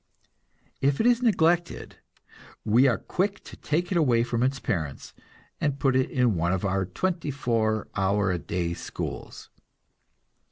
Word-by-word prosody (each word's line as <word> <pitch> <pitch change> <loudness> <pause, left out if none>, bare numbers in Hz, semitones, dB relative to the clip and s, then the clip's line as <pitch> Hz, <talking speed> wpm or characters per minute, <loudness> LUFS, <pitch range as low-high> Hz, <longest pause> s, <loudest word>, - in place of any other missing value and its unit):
If 140 +1 +2
it - - +2
is 245 0 +4
neglected, 175 -7 +1 0.7
we 120 +6 +5
are 125 - +2
quick 200 +2 -2
to - - -11
take 170 +5 -2
it 175 - +2
away 120 -7 +3
from 120 -1 -2
its 135 +1 +1
parents, 80 -10 -4 0.5
and 145 -2 0
put 135 -2 +1
it 130 0 +2
in 125 -4 +2
one 85 +1 0
of 95 +1 -1
our 95 0 0
twenty 170 - -2
four 115 -5 0
hour 95 0 +1
a 90 - -1
day 85 +2 -2
schools. 85 - -7
125 Hz, 155 wpm, -26 LUFS, 95-160 Hz, 0.7 s, we